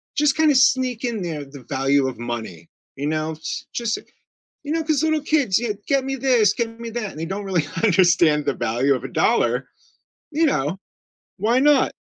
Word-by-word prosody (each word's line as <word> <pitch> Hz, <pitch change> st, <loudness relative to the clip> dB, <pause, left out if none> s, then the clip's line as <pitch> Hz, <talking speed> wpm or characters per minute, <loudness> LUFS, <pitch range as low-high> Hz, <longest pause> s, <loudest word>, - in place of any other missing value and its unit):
just 295 Hz, -1 st, +2 dB
kinda 310 Hz, -3 st, +4 dB
sneak 255 Hz, -2 st, +3 dB
in 230 Hz, -5 st, -2 dB
there 155 Hz, -4 st, -4 dB
the 135 Hz, -1 st, -13 dB
value 135 Hz, 0 st, +2 dB
of 125 Hz, -3 st, -6 dB
money, 110 Hz, -9 st, -6 dB, 0.3 s
you 140 Hz, +2 st, -3 dB
know, 155 Hz, +1 st, -2 dB
j 155 Hz, -, -22 dB, 0.3 s
just, 230 Hz, -2 st, -1 dB, 0.7 s
you 290 Hz, -, -3 dB
know, 325 Hz, 0 st, -1 dB
'cause 305 Hz, -2 st, +1 dB
little 315 Hz, -1 st, +1 dB
kids, 285 Hz, -11 st, +2 dB
yeah, 235 Hz, -2 st, -1 dB, 0.2 s
get 275 Hz, -1 st, +2 dB
me 270 Hz, 0 st, -2 dB
this 245 Hz, -6 st, +3 dB
get 230 Hz, 0 st, -3 dB
me 235 Hz, -, -6 dB
that, 225 Hz, -3 st, -4 dB
and 155 Hz, -, -9 dB
they -, -, -2 dB
don't 195 Hz, +3 st, -4 dB
really 180 Hz, -6 st, 0 dB, 0.2 s
understand 175 Hz, -6 st, +4 dB
the -, -, 0 dB
value 130 Hz, +5 st, +1 dB
of -, -, -5 dB
a -, -, -4 dB
dollar, -, -, +1 dB, 0.6 s
you 320 Hz, +2 st, +2 dB
know, 165 Hz, -, 0 dB, 0.6 s
why 225 Hz, +6 st, +2 dB
not? 285 Hz, -1 st, +4 dB
210 Hz, 195 wpm, -22 LUFS, -, 0.7 s, kinda